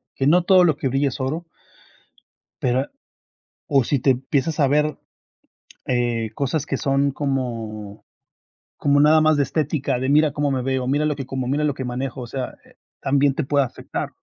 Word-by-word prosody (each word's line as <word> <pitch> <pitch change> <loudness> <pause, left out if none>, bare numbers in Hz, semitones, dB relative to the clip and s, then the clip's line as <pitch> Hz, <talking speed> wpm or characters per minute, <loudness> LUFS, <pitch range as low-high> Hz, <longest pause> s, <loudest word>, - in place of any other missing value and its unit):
que 135 - 0
no 175 +3 +5
todo 185 -1 +6
lo 160 -4 +3
que 135 - -1
brilla 135 +2 +1
es 130 - -8
oro. 155 +6 -2 1.2
Pero 130 +2 +1 0.8
o 140 -5 +3
si 140 - +1
te 135 +2 +2
empiezas 135 +4 0
a 140 - +4
ver, 150 +1 +1 0.9
eh, 120 -3 0
cosas 140 +3 -1
que 135 - -1
son 140 +1 +1
como 115 -7 -4 0.7
como 145 0 +2
nada 155 +2 +6
más 155 -1 +4
de 145 - +3
estética, 145 -3 -1
de 130 +1 -2
mira 150 +1 +4
cómo 145 0 0
me 130 -2 -1
veo, 130 -1 -1
mira 145 +3 +1
lo 150 -1 0
que 135 - -6
como, 130 -2 -3
mira 145 +3 0
lo 145 -3 +1
que 130 - -5
manejo, 130 +1 -4
o - - -6
sea, 130 0 -5
eh, - - -22 0.2
también 140 0 +2
te 155 - -1
puede 140 +1 +2
afectar. 125 - -5
135 Hz, 190 wpm, -22 LUFS, 130-150 Hz, 1.2 s, todo